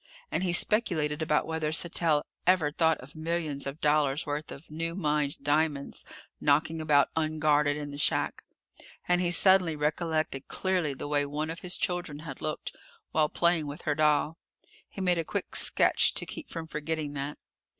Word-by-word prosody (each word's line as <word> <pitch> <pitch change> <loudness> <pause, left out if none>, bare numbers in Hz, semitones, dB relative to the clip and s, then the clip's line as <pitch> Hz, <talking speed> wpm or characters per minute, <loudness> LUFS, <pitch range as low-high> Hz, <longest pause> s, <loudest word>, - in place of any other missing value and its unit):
And - - 0
he 185 -2 0
speculated 170 -6 +2
about 150 -1 +1
whether 160 -1 -2
Sattell 160 -2 +2 0.2
ever 180 -5 +4
thought 160 0 +2
of 130 +5 -14
millions 155 -3 -3
of 140 +3 -6
dollars' 150 -1 +2
worth 150 0 -4
of 150 +2 -11
new 165 +2 -3
mined 150 -5 0
diamonds 145 -1 0 0.3
knocking 155 +3 +2
about 145 -3 +3
unguarded 150 -2 +2
in 145 -1 -6
the 145 - -8
shack, - - 0 0.7
and 180 0 +3
he 175 - +1
suddenly 180 -2 +4
recollected 155 -2 -1
clearly 180 -7 -1
the 140 - -6
way 145 0 +1
one 150 +2 -3
of 165 - -7
his 180 0 0
children 175 -4 -2
had 150 -5 -8
looked 155 0 -4 0.4
while 155 -1 +2
playing 170 -3 +1
with 145 +1 -8
her 150 - +1
doll. 150 +1 +2 0.5
He 195 - -8
made 180 -2 +2
a - - 0
quick - - -4
sketch - - +4
to - - -3
keep - - -8
from 165 -1 -5
forgetting 155 -1 -4
that. 140 +1 -4
155 Hz, 170 wpm, -28 LUFS, 145-165 Hz, 0.7 s, ever